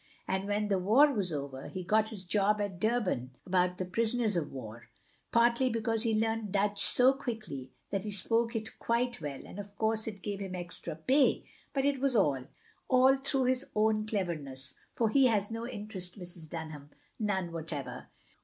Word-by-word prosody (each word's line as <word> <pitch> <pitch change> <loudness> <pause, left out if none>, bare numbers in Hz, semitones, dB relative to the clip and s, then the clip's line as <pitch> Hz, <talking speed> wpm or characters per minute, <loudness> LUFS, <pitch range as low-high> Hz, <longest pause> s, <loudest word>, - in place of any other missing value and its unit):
And 190 +1 -1
when 205 +1 0
the 195 -2 +1
war 255 +11 +5
was 195 -7 0
over, 140 -3 -5
he 185 - -5
got 215 +4 +2
this 210 -4 -3
job 205 +3 +2
at 200 -4 -3
Durban 185 - 0
about 180 0 +2
the 185 - -2
prisoners 220 +3 +1
of 160 -4 -1
war 115 -3 -9 0.2
— - - -37
partly 235 +2 +4
because 225 -1 0
he 220 -2 +2
learnt 225 -2 -1
Dutch 205 +1 +1
so 255 +2 +6
quickly 215 - -5 0.2
that 195 -2 -1
he 210 - -4
spoke 230 +4 +1
it 220 0 -3
quite 235 -2 0
well, 145 -3 -5
and 205 - -9
of 205 0 -9
cotirse 220 0 +1
it 200 -4 -6
gave 205 -2 -3
him 190 -2 -5
extra 175 -2 -5
pay; 260 - +3 0.3
but 270 -1 0
it 285 -1 +2
was 270 -1 +2
all, 140 - +2 0.4
all 260 +1 +6
through 270 0 0
his 255 +1 +1
own 215 0 +2
cleverness, 155 -11 -3 0.2
for 230 - +1
he 270 +3 +5
has 210 -3 +1
no 230 +1 -4
interest, 205 -6 -4
Mrs. 175 -4 -6
Dunham, 155 -3 -7 0.3
none 190 -5 -1
whatever." 160 -4 -5
205 Hz, 185 wpm, -31 LUFS, 180-230 Hz, 0.4 s, so